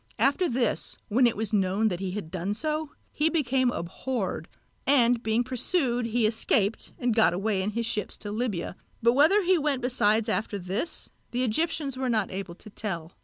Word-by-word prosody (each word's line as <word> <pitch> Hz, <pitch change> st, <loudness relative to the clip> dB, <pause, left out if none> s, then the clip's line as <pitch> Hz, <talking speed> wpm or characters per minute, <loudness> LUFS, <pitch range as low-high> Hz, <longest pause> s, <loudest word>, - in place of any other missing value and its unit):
After 335 Hz, +6 st, +2 dB
this, 240 Hz, -2 st, -1 dB
when 245 Hz, +4 st, +5 dB
it 230 Hz, -, -1 dB
was 220 Hz, 0 st, -2 dB
known 200 Hz, +2 st, +2 dB
that 175 Hz, -3 st, -3 dB
he 190 Hz, -1 st, -3 dB
had 180 Hz, -4 st, -5 dB
done 190 Hz, +3 st, -2 dB
so, 310 Hz, +3 st, -2 dB, 0.2 s
he 305 Hz, +2 st, +2 dB
became 265 Hz, -5 st, +2 dB
abhorred, 190 Hz, -2 st, -3 dB, 0.4 s
and 245 Hz, -4 st, +4 dB
being 225 Hz, +1 st, +1 dB
pursued 250 Hz, -1 st, 0 dB
he 230 Hz, 0 st, +1 dB
escaped 215 Hz, -1 st, 0 dB
and 245 Hz, -2 st, +1 dB
got 220 Hz, -7 st, +5 dB
away 200 Hz, +1 st, 0 dB
in 195 Hz, -, -1 dB
his 230 Hz, +2 st, -2 dB
ships 210 Hz, -3 st, -2 dB
to 205 Hz, -, -6 dB
Libya; 210 Hz, -6 st, -2 dB, 0.3 s
but 235 Hz, +1 st, +5 dB
whither 320 Hz, +10 st, +5 dB
he 365 Hz, -1 st, +3 dB
went 285 Hz, -4 st, 0 dB
besides 225 Hz, -3 st, +2 dB
after 215 Hz, -1 st, -1 dB
this, 195 Hz, -, -3 dB, 0.2 s
the 245 Hz, +1 st, -1 dB
Egyptians 280 Hz, +2 st, -1 dB
were 260 Hz, -1 st, -1 dB
not 215 Hz, -4 st, +1 dB
able 190 Hz, -2 st, -5 dB
to 215 Hz, -, -13 dB
tell. 170 Hz, -6 st, -4 dB
230 Hz, 185 wpm, -27 LUFS, 205-260 Hz, 0.4 s, when